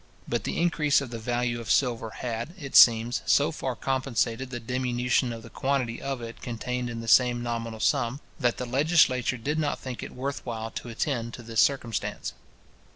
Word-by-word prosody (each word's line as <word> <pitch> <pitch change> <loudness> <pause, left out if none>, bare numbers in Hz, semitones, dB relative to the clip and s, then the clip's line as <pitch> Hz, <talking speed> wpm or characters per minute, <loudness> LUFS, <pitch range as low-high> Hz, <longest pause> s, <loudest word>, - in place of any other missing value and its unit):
But - - -1
the - - -2
increase 160 -4 +3
of 140 -4 -6
the 115 - -5
value 120 +1 -1
of 115 - -8
silver 120 -4 +2
had, 120 +8 -5
it 140 -6 -7
seems, 115 +1 +7
so 145 +3 +4
far 130 -5 -3
compensated 130 -1 -1
the 120 -2 -5
diminution 125 +1 0
of 115 -1 -7
the 115 - -12
quantity 130 -4 -1
of 135 -3 -3
it 115 0 -8
contained 125 +1 -3
in 115 -1 -5
the 115 - -8
same 120 0 +4
nominal 115 -1 -3
sum, 120 +4 +1 0.2
that 120 -4 +1
the 125 - -3
legislature 130 -2 +3
did 150 +7 -2
not 150 -2 0
think 130 -2 -6
it - - -8
worth 135 +2 -4
while 115 -2 -4
to 120 - -6
attend 115 -1 -2
to 120 - -10
this 115 -1 +1
circumstance. 120 -6 -1
120 Hz, 190 wpm, -27 LUFS, 115-135 Hz, 0.2 s, seems